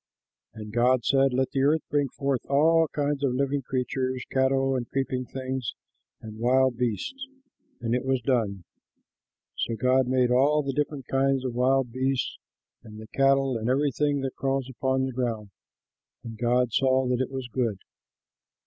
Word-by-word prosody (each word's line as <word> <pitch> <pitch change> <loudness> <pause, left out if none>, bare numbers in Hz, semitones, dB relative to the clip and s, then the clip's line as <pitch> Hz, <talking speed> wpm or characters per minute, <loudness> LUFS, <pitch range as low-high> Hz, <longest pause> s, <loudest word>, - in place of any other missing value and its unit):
And 105 -1 -8
God 120 +1 +3
said, 135 -1 +3
"Let 130 +1 0
the 135 - 0
earth 150 +3 +2
bring 145 -1 +1
forth 140 -2 -2
all 160 +3 +4
kinds 145 -1 -2
of 130 -3 +1
living 140 +1 0
creatures, 130 0 -2
cattle 135 0 +2
and 120 -2 -3
creeping 130 -1 -2
things 130 -2 -4 0.4
and 110 -1 -10
wild 130 +1 +3
beasts." 125 - -3 0.5
And 115 0 -1
it 125 - 0
was 130 -1 +1
done. 110 -8 0 1.0
So 115 - -1
God 130 +2 +2
made 125 -1 +2
all 145 +4 +3
the 135 -1 -2
different 145 -1 -2
kinds 135 0 +1
of 125 - -2
wild 130 0 +2
beasts, 130 +1 -1 0.4
and 110 -2 -12
the 110 0 -11
cattle, 135 -1 +3
and 110 +2 -2
everything 145 +1 +1
that 135 -1 -4
crawls 135 -1 -1
upon 130 +1 0
the 130 - -3
ground. 115 -5 -3 0.7
And 115 -2 -7
God 120 +1 +1
saw 130 0 +3
that 125 0 0
it 130 - -2
was 130 -2 -5
good. 115 -4 -1
130 Hz, 165 wpm, -26 LUFS, 125-135 Hz, 1.0 s, all